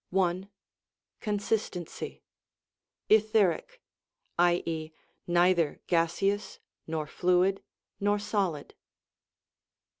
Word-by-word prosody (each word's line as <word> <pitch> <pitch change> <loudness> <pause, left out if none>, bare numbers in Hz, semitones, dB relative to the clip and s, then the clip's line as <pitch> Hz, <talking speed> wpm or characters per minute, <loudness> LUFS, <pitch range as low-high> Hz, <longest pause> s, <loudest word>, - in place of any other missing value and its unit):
I. 185 +1 +1 0.7
Consistency! 205 -4 -3 0.8
Etheric 215 - +2 0.6
(i.e., 165 -2 +1 0.4
neither 175 -3 +3
gaseous, 180 +4 0 0.3
nor 160 -1 -2
fluid 180 +4 +2 0.4
nor 205 +1 +2
solid). 200 -7 -2
180 Hz, 60 wpm, -29 LUFS, 170-205 Hz, 0.8 s, neither